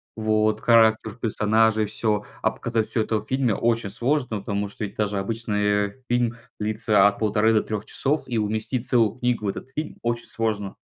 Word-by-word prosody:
вот 110 0 +1
характер 110 -1 +4
персонажей, 110 0 +2
всё, 105 -1 0 0.2
а - - +2
показать 115 -2 -2
всё 110 0 0
это 110 0 0
в 105 - -12
фильме 130 -4 +1
очень 115 -2 0
сложно, 120 0 -1
потому 100 0 -3
что 105 - -5
ведь 100 - -9
даже 105 -2 -1
обычный 105 +1 -1
фильм 120 -1 +1 0.2
длится 105 -1 +2
от 100 0 +2
полторы 110 +1 +2
до 110 - +4
3 105 -1 -4
часов, 145 +3 -1
и 120 -2 -2
уместить 110 +4 -1
целую 115 -1 +2
книгу 120 -3 0
в 100 - +1
этот 130 - -6
фильм 155 +1 -4
очень 120 0 -2
сложно. 105 -3 -2
110 Hz, 180 wpm, -24 LUFS, 105-115 Hz, 0.2 s, характер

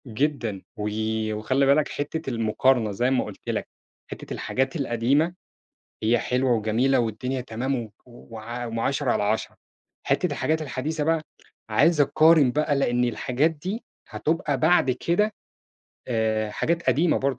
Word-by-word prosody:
جدًا 120 -5 -1 0.2
وي 110 +1 -2
وخلّي 130 +6 +1
بالك 140 +2 +4
حتة 150 +1 -4
المقارنة 115 0 +2
زي 120 +6 0
ما 130 - +2
قُلت - - -9
لك، - - -2 0.4
حتة - - -7
الحاجات 135 +2 -1
القديمة 140 +4 +1 0.7
هي 115 +2 +3
حلوة 125 +1 0
وجميلة 115 +5 +2
والدنيا 125 +3 -2
تمام 125 +3 -2
و 115 -4 -5
وع 120 0 -8
وم 115 -1 -4
عشرة 135 +1 0
على - - +1
عشرة. 105 +2 -1 0.5
حتة - - +1
الحاجات 160 0 0
الحديثة 150 +2 -3
بقى، 165 +1 +1 0.5
عايز 150 +8 +4
أقارن 155 -2 +5
بقى 150 +1 +1
لإن 125 -3 +1
الحاجات 125 +5 +1
دي 185 +9 -5 0.3
هتُبقى 150 -3 -1
بعد 160 -4 +4
كده 175 - 0 0.8
آآ، 110 -2 0
حاجات 170 +9 -1
قديمة 155 +6 +3
برضه 135 -2 -1
130 Hz, 140 wpm, -25 LUFS, 115-150 Hz, 0.8 s, أقارن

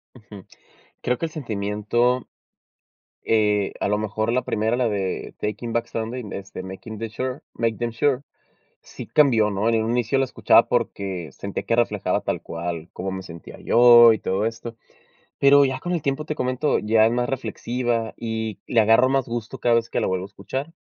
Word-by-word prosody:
Ujú. 105 -5 -13 0.6
Creo 125 0 0
que - - -2
el 160 - -6
sentimiento. 120 -1 -1 1.0
Eh, 105 -2 +2
a - - +1
lo 105 - +2
mejor 110 +1 -2
la 130 +1 +1
primera, 110 +3 0
la 125 -2 +1
de 100 -3 -3
Taking 105 +2 -4
Back 120 - 0
Sunday, 115 +3 -4
es 100 0 -8
de - - -6
Making 100 +4 -8
the 115 +1 -5
Sure, 130 +4 -4 0.2
MakeDamnSure, 120 +3 0 0.6
sí - - -10
cambió, 120 -8 +4
¿no? 100 +2 -1
En 115 -1 +2
un 115 - -1
inicio 125 +2 +1
lo 135 - +2
escuchaba - - +4
porque 90 -6 -2
sentía 100 +8 -5
que 115 - +1
reflejaba 120 0 0
tal - - -3
cual 85 0 -5
cómo 95 +2 -4
me 95 0 -5
sentía 85 -4 -11
yo, 120 -1 +7
y 110 - -3
todo 95 +4 -1
esto. 115 +1 -5 0.6
Pero 140 +1 +6
ya 130 -1 -2
con 175 - -3
el 170 -4 -1
tiempo, 140 +2 -2
te 155 - -2
comento, 130 +2 0
ya 110 +1 +3
es 115 - +1
más 120 0 0
reflexiva 120 -3 -2
y 110 -2 -4
le 115 - +3
agarro 115 +4 +5
más 135 -1 +1
gusto 115 -1 -5
cada 120 -1 +3
vez 115 0 0
que - - -1
la - - 0
vuelvo 95 0 -1
a - - -6
escuchar. 135 +9 -6
115 Hz, 190 wpm, -23 LUFS, 105-125 Hz, 1.0 s, yo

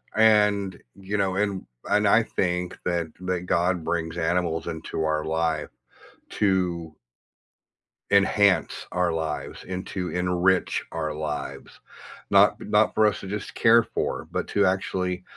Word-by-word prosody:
And, 105 -3 +3
you 100 +1 -4
know, 95 -2 0
and 100 -2 -1 0.2
and 105 0 +2
I 115 +3 +5
think 90 -4 -2
that 85 -2 0
that 90 -1 -2
God 90 0 +1
brings 80 0 -2
animals 85 -1 0
into 80 0 -4
our 75 -1 0
life 80 -1 -1 0.6
to 90 -5 0 1.2
enhance 100 0 +3
our 90 -1 +1
lives, 80 -1 -4
and 95 0 -4
to 90 -2 -4
enrich 90 +1 +1
our 80 -2 -2
lives, 75 -1 -5 0.5
not - - +5
not - - +2
for 110 0 +4
us 105 - 0
to - - -8
just 105 +1 -5
care 115 0 +5
for, - - -3
but - - -3
to 100 -1 +2
actually 95 -1 -1
90 Hz, 135 wpm, -25 LUFS, 85-100 Hz, 1.2 s, I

